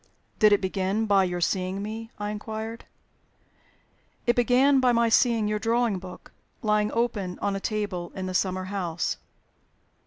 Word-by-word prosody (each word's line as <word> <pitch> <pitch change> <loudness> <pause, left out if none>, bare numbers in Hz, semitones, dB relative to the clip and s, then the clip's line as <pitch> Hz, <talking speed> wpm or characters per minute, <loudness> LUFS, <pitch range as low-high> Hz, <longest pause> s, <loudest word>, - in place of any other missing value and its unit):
"Did 215 -1 +6
it 205 - +4
begin 190 +3 0
by 200 -2 +4
your 175 -1 -3
seeing 185 +2 -1
me?" 225 +2 -6
I 205 0 -3
inquired. 220 +2 -6 1.4
"It 240 - +3
began 255 +3 +4
by 255 -1 +4
my 235 -1 +3
seeing 225 -1 +3
your 210 0 -1
drawing 230 -3 +1
book 180 0 -11 0.3
lying 210 -1 +2
open 215 -6 -1
on 200 -1 -1
a - - -2
table 195 -5 -3
in 185 -1 -4
a 185 - -4
summer 185 0 0
house." 185 -3 -2
210 Hz, 155 wpm, -26 LUFS, 190-225 Hz, 1.4 s, Did